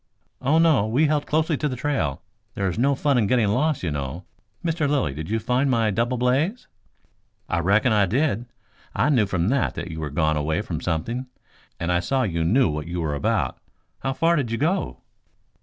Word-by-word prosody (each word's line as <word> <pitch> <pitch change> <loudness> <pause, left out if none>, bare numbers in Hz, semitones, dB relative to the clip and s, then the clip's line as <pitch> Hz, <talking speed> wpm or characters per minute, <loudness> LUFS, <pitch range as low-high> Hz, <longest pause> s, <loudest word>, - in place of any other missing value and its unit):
"Oh, 140 +5 +3
no; 155 -10 +4
we 130 +8 +2
held 150 -1 0
closely 155 0 +1
to 150 - -1
the 130 - -3
trail. 125 - -2 0.3
There 100 - -1
is 90 +4 -2
no 140 +3 +3
fun 140 -1 +2
in 105 - +2
getting 115 -2 +2
lost, 145 +6 +1
you 85 - -1
know. 70 +4 -4 0.4
Mr 160 -3 0
Lilly, 140 - +1
did 80 +3 -6
you 110 - +1
find 125 +4 +1
my 115 -4 +2
double 120 +5 0
blaze?" 140 - 0 0.8
"I 85 - 0
reckon 100 +7 +3
I 105 -2 +3
did. 120 - 0 0.5
I 150 - +2
knew, 120 -8 +3
from 90 0 0
that, 135 +1 0
that 90 - -5
you 80 0 -6
had 75 -2 -5
gone 80 -1 +2
away 80 +2 0
after 90 -7 -3
something, 115 +10 -2 0.5
and 85 +1 -1
I 90 - +3
saw 130 +9 0
you 85 -7 -1
knew 115 +10 +3
what 75 -1 -3
you 85 +1 -3
were 80 -3 -1
about. 70 - -1 0.4
How 135 - -2
far 165 +5 +2
did 135 -6 -1
you 115 - -1
go?" 170 +9 -1
115 Hz, 205 wpm, -24 LUFS, 85-140 Hz, 0.8 s, no